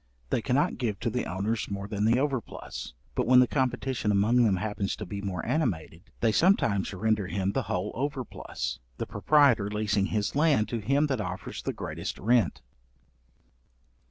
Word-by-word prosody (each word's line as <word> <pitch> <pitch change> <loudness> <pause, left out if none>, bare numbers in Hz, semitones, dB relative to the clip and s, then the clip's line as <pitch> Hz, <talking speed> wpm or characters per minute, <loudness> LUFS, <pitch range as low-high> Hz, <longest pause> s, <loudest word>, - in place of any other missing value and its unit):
They - - +1
cannot 135 +4 +1
give 110 -5 -1
to 115 - 0
the 125 +2 -1
owners 100 +5 -2
more 100 0 -4
than 105 0 -1
the 115 +2 +4
overplus. 135 - -3 0.2
But - - -1
when 125 0 +7
the 125 - +7
competition 130 -3 0
among 105 +4 +3
them 105 -4 +3
happens 100 +1 -2
to 105 - -6
be 100 +2 -5
more 95 -4 -3
animated, 90 - -2
they 115 - +4
sometimes 115 - +3
render 105 0 0
him 95 0 -1
the 135 - 0
whole 90 +3 -1
overplus, 125 - -4 0.2
the - - -3
proprietor 140 -9 +3
leasing 105 -1 0
his 105 +1 -1
land 145 -7 +3
to 120 - -2
him 140 +7 +2
that 135 -6 -1
offers 90 -1 -5
the - - -2
greatest - - -5
rent. 115 - +2
110 Hz, 170 wpm, -28 LUFS, 100-125 Hz, 0.2 s, when